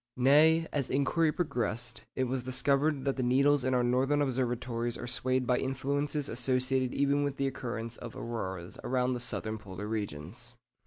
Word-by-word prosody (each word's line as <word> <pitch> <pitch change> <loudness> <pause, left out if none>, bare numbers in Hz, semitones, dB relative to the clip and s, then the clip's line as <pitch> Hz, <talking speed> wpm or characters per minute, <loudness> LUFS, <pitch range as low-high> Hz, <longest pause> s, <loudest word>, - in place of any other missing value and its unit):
Nay, 155 +6 +5
as 140 -4 -1
inquiry 150 +4 +2
progressed, 120 - -3
it 130 - +1
was 130 0 -2
discovered 140 +2 +1
that 135 -1 0
the - - 0
needles 135 +3 +3
in 130 0 +1
our 125 - +3
northern 130 +4 +2
observatories 120 -3 -1
are - - -6
swayed 130 +1 +1
by 125 +1 +2
influences 140 +2 -1
associated 130 +1 +1
even 140 +1 +2
with 140 -1 -2
the 140 - 0
occurrence 120 -3 -4
of 120 -2 -8
auroras 95 -7 -5
around 125 0 +1
the 125 - -3
southern 110 -2 -3
polar 100 -1 -7
regions. 110 +3 -5
130 Hz, 165 wpm, -30 LUFS, 120-140 Hz, -, Nay